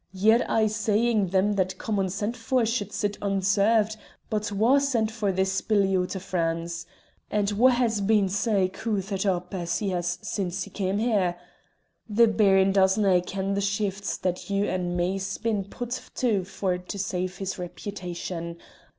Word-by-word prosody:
Ye're 220 +5 +4
aye 220 -1 +3
saying 215 0 +1
them 190 +3 +2
that 185 -1 -1
come 210 -1 -2
unsent 200 +4 -1
for 245 +1 +1
should 215 -3 -1
sit 205 -1 -2
unserved; 205 +2 +2 0.3
but 210 -1 -1
wha 225 +7 +4
sent 240 -6 +1
for 215 -3 -1
this 190 0 0
billy 200 -3 +2
oot 180 +1 0
o' - - -2
France? 170 -2 -2 0.4
and 205 -1 0
wha 230 +6 +5
has 240 -4 +1
been 205 -1 +3
sae 200 0 +1
coothered 195 0 -2
up 180 0 -1
as 175 -2 -1
he 205 - -1
has 175 0 -1
since 190 -2 -2
he - - -11
cam' 195 0 -1
here? 205 -6 +1 0.7
The 230 +2 +5
Baron 195 -3 +4
doesnae 190 -1 +4
ken 195 0 -2
the 200 - 0
shifts 200 0 -1
that 180 +1 -3
you 200 0 +1
and 180 -2 -2
me's 190 +2 -1
been 215 -4 -1
put 245 +5 -5
to 215 -7 +1
for 185 -1 -2
to 180 +3 -7
save 185 -1 -2
his 195 -1 -4
repitation. 175 -2 -6
195 Hz, 165 wpm, -26 LUFS, 185-215 Hz, 0.7 s, wha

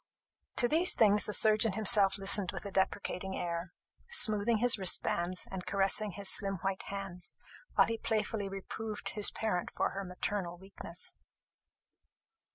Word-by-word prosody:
To 240 - +3
these 330 +6 +2
things 210 -2 +4
the - - -4
surgeon 215 -1 +2
himself 205 -1 +4
listened 195 -1 +4
with - - -6
a 200 - -6
deprecating 190 0 -2
air, 170 0 -4 0.4
smoothing 220 - +3
his 240 -1 +1
wristbands, 180 -1 0
and 190 -1 -6
caressing 195 +2 0
his 200 +1 -3
slim 195 0 +5
white 195 -1 -2
hands, 195 -3 -5 0.4
while - - +5
he 230 -1 -4
playfully 215 -2 -2
reproved 210 +2 -6
his 210 -1 +2
parent 195 -5 -3
for - - -2
her 195 - -5
maternal 180 -1 -4
weakness. 185 -2 -9
200 Hz, 145 wpm, -31 LUFS, 190-215 Hz, 0.4 s, slim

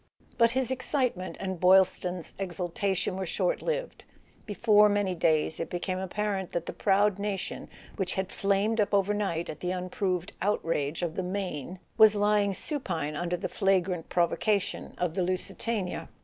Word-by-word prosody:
But 230 0 +5
his 260 +1 -1
excitement 255 -7 -1
and 190 -2 -3
Boylston's 185 -1 +3
exultation 185 +1 -2
were 190 - -2
short - - 0
lived. - - -3 0.4
Before 210 0 +5
many 205 -2 +1
days 160 -2 +1
it 165 - -3
became 185 +1 -2
apparent 190 0 -2
that 170 -1 -2
the - - -5
proud 200 0 +2
nation 200 -2 -4 0.3
which 190 -3 -1
had 190 -1 -2
flamed 200 +3 +1
up 205 0 +1
overnight 200 -4 0
at 155 - -7
the 180 - -3
unproved 185 0 -2
outrage 165 -5 0
of 170 -2 -1
the 190 - -2
Maine 180 -3 -4 0.2
was 215 -1 +8
lying 205 -1 +2
supine 170 - -3
under 175 +2 -1
the - - -3
flagrant 185 -3 0
provocation 195 +3 0
of 180 -3 -1
the 185 - -1
Lusitania 185 +2 -2
190 Hz, 150 wpm, -28 LUFS, 180-205 Hz, 0.4 s, was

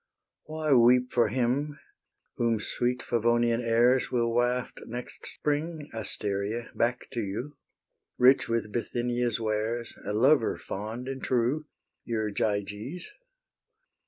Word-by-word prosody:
Why 155 -1 0
weep 125 +1 +5
for 120 -2 +3
him 130 +6 0 0.6
whom 115 -2 +1
sweet 125 +4 -1
Favonian 120 0 +2
airs 120 +2 +3
Will 115 -2 +1
waft 120 +1 0
next 120 +2 -7
spring, 150 +1 -3
Asteria, 105 +1 -3
back 120 +2 0
to 120 -3 -2
you, 120 +9 -5 0.6
Rich 130 0 +5
with 115 -2 -1
Bithynia's 120 0 -1
wares, 110 +2 -1
A 105 - -3
lover 125 +2 +4
fond 110 +5 -6
and 135 0 -5
true, 130 +5 +1 0.4
Your 110 -2 -2
Gyges? 105 - -3
120 Hz, 115 wpm, -28 LUFS, 115-125 Hz, 0.6 s, weep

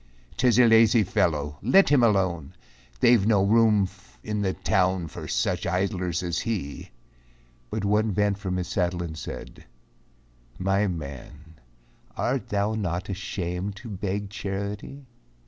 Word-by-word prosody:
"'T 130 - +1
is 120 -2 +4
a 125 - +7
lazy 115 0 +5
fellow, 75 -5 -1
let 190 - +5
him 145 -3 +5
alone, 95 -9 +1 0.5
They've 120 -4 +5
no 105 -2 +3
room 105 -1 +4 0.4
in 105 -1 -2
the 95 -2 0
town 95 -4 +1
for - - -8
such - - -1
idlers 90 -1 -1
as 85 -2 -1
he." 100 -12 -4 0.8
But 110 -2 -3
one 105 +2 +2
bent 105 0 +1
from 95 -2 -3
his 90 -1 -3
saddle 90 -1 -1
and 80 -2 -6
said, 80 - -8 0.9
"My 95 +2 +1
man, 75 -1 -8 0.6
Art 130 +1 -1
thou 100 +1 0
not 95 -2 -3
ashamed 95 0 -4
to 115 +3 -10
beg 100 0 -4
charity! 100 +7 -5
100 Hz, 140 wpm, -25 LUFS, 90-105 Hz, 0.9 s, a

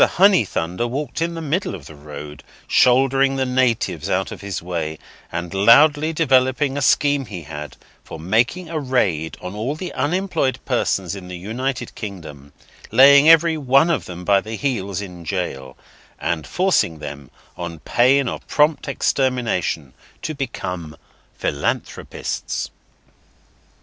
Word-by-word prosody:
Honeythunder 120 - +2
walked 140 +3 -4
in 170 +1 -1
the 165 - -5
middle 155 - -1
of 80 -7 -11
the 80 - -11
road, 75 -1 -10 0.2
shouldering 135 +1 +4
the 135 -1 0
natives 125 -2 0
out - - 0
of - - -8
his 100 -3 -4
way, 80 -3 -4 0.3
and 85 +1 -4
loudly 145 +10 +5
developing 135 -2 +2
a 145 - -2
scheme 140 0 +2
he 90 -5 -7
had, 75 -2 -8 0.3
for - - -9
making 115 - 0
a 160 -1 -3
raid 100 - 0
on 90 +1 -6
all 115 +8 -3
the 180 +3 -6
unemployed 145 -3 0
persons 95 -2 0
in 95 -2 -9
the 90 -1 -7
United 120 +6 -4
Kingdom, 80 -9 -9 0.4
laying 140 +5 +7
them 160 - +10
every 165 0 +3
one 140 +4 +3 0.2
by 100 +1 +3
the 110 +2 -6
heels 100 -8 -2
in 90 -4 -9
jail, 70 -8 -4 0.4
and 80 -3 -2
forcing 180 - +1
them, 70 -3 -8 0.3
on 85 -1 -6
pain 130 - +3
of - - -5
prompt 150 +1 +2
extermination, 115 - -1 0.3
to 155 - -3
become 90 - -5 0.4
philanthropists. 70 0 -3
120 Hz, 140 wpm, -21 LUFS, 85-140 Hz, 0.4 s, them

